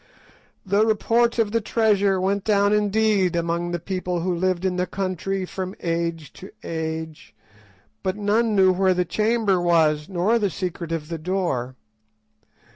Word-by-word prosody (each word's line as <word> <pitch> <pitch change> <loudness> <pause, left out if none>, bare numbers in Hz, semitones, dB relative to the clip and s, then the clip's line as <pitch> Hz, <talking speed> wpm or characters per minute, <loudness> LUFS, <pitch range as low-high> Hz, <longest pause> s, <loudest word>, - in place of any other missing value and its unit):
The 200 +2 +3
report 230 +2 +2
of 220 -3 +1
the 230 +1 +1
treasure 205 -3 +2
went 195 +1 0
down 205 -1 +2
indeed 210 -3 +2
among 170 +1 -1
the 175 - -2
people 180 0 -3
who 180 +1 -1
lived 185 +1 -1
in 185 -1 0
the 180 0 0
country 190 0 -3
from 185 +1 -5
age 165 -2 -3
to 190 - -11
age, 160 -4 -5 0.7
but 190 +1 -2
none 215 +2 +1
knew 190 -1 +5
where 185 0 +2
the 180 0 +1
chamber 215 -1 +1
was, 160 -3 +2
nor 195 +6 +1
the 205 -2 +1
secret 175 -1 -5
of 160 -2 -3
the 165 -1 -4
door. 155 -8 -2
185 Hz, 155 wpm, -23 LUFS, 170-205 Hz, 0.7 s, knew